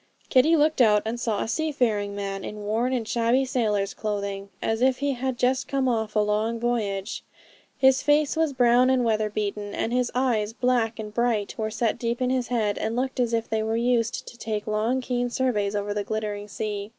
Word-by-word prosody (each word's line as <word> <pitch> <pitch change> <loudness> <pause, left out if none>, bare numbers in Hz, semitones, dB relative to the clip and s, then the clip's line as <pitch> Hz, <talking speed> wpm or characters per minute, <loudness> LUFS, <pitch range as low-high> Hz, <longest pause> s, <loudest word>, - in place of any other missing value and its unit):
Kitty 295 +5 +5
looked 310 -2 +3
out 210 -3 +5
and 230 +2 -3
saw 220 -4 -1
a - - -5
seafaring 230 -8 0
man, 195 -1 -4
in 210 0 -6
worn 225 +5 0
and 240 -4 -1
shabby 240 +4 +2
sailor's 210 -6 0
clothing, 200 -2 -4
as 225 +1 -1
if 260 0 +3
he 285 0 0
had 260 -1 -2
just 255 +1 +1
come 270 -1 0
off 220 -3 -1
a - - +4
long 210 +2 0
voyage. 215 -4 -2 0.5
His 265 0 +4
face 295 0 +2
was 320 -2 +1
brown 250 -1 +4
and 255 -2 +2
weather 215 -1 +1
beaten; 205 0 -3
and 230 - -2
his 250 -1 +1
eyes, 230 -5 +1
black 245 -2 +1
and 215 -1 -7
bright, 230 -3 0
were 220 -1 -2
set 225 +1 -1
deep 235 0 -2
in 255 0 +1
his 255 -2 0
head, 215 -4 0
and 220 +1 -2
looked 260 +1 -2
as 240 -2 +1
if 230 -1 0
they 220 -1 -1
were 220 +1 -1
used 235 -1 0
to 240 - -11
take 215 -2 -3
long, 220 +4 0
keen 245 -1 -1
surveys 220 -6 0
over 205 0 -2
the 205 0 -2
glittering 210 -1 -4
sea. 205 -1 -4
230 Hz, 210 wpm, -25 LUFS, 210-250 Hz, 0.5 s, Kitty